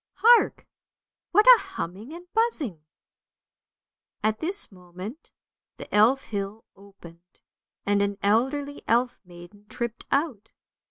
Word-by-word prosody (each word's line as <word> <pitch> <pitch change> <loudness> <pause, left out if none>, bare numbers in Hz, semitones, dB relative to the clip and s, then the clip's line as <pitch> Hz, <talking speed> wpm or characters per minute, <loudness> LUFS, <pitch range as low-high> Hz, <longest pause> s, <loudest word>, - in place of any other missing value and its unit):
Hark! 475 +2 +4 0.7
what 420 +3 +5
a - - +9
humming 240 - -7
and 345 +2 -10
buzzing? 315 - -1 0.7
" - - -56
At 215 0 0
this 375 - 0
moment 185 - -10 0.5
the - - -11
Elf 230 +6 +4
hill 205 +1 -5
opened, 180 -3 -17 0.5
and 200 0 +2
an 200 0 -1
elderly 270 +7 0
elf 240 +2 +1
maiden 180 +4 -15
tripped 235 0 -5
out. 270 -7 -1
220 Hz, 115 wpm, -25 LUFS, 200-290 Hz, 0.7 s, a